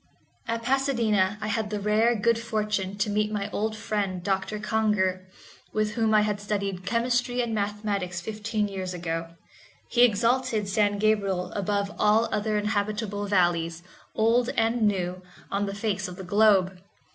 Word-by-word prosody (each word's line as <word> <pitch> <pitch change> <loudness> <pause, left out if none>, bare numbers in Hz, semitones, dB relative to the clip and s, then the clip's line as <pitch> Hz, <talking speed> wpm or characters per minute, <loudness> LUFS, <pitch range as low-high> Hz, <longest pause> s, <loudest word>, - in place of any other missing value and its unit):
At 230 0 -2
Pasadena 230 -7 +1
I 215 - -2
had 215 0 -1
the 210 -1 -2
rare 215 +3 +3
good 230 +2 +2
fortune 210 -4 -2
to 210 +1 0
meet 210 +1 0
my 210 -1 -3
old 215 +1 -1
friend 200 -4 -2
Doctor 195 +2 -1
Congar, 210 -4 0 0.5
with 215 0 0
whom 225 -1 +1
I 210 - +6
had 210 -1 -1
studied 200 -3 -3
chemistry 245 +2 0
and 235 -2 0
mathematics 205 -3 -2
fifteen 215 +2 -2
years 190 -2 -5
ago. 165 -1 -4 0.6
He 240 - +3
exalted 235 -1 +2
San 205 0 +1
Gabriel 200 -4 +1
above 200 0 -1
all 215 +2 +4
other 210 0 0
inhabitable 210 0 -1
valleys, 175 -3 +1 0.3
old 235 +3 +3
and 225 -1 +2
new, 185 -2 -1 0.3
on 200 +1 0
the 195 - -4
face 200 -2 -2
of 180 - -8
the 190 - -8
globe. 190 -1 +3
210 Hz, 155 wpm, -26 LUFS, 195-220 Hz, 0.6 s, I